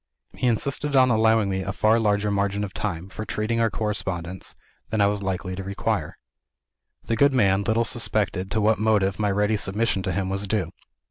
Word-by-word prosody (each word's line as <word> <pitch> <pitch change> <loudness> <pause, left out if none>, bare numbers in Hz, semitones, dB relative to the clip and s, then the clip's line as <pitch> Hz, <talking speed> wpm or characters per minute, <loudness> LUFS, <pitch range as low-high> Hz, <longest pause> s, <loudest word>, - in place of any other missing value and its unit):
He 125 - -1
insisted 140 +5 0
on 130 -1 +5
allowing 110 -1 +3
me 95 -1 -1
a 95 - -3
far 110 +2 +3
larger 105 -1 +1
margin 100 0 0
of 95 - -5
time, 90 -4 -3
for 105 - -7
treating 110 +2 -2
with 115 - +3
our - - +1
correspondents, 95 -4 -3 0.3
than 110 - -1
I 100 - +5
was 100 0 +1
likely 95 -1 -3
to 95 - -5
require. 100 +1 -2 0.9
The 115 - -1
good 140 +4 +4
man 100 -6 +3
little 115 +2 +1
suspected 100 -5 -1
to 110 - 0
what 110 0 +3
motive 105 -3 +2
my 105 -1 +1
ready 105 +2 +1
submission 100 +1 0
to 95 -1 -2
him 95 +2 -1
was 100 +1 -2
due. 95 -5 -1
105 Hz, 200 wpm, -24 LUFS, 95-110 Hz, 0.9 s, on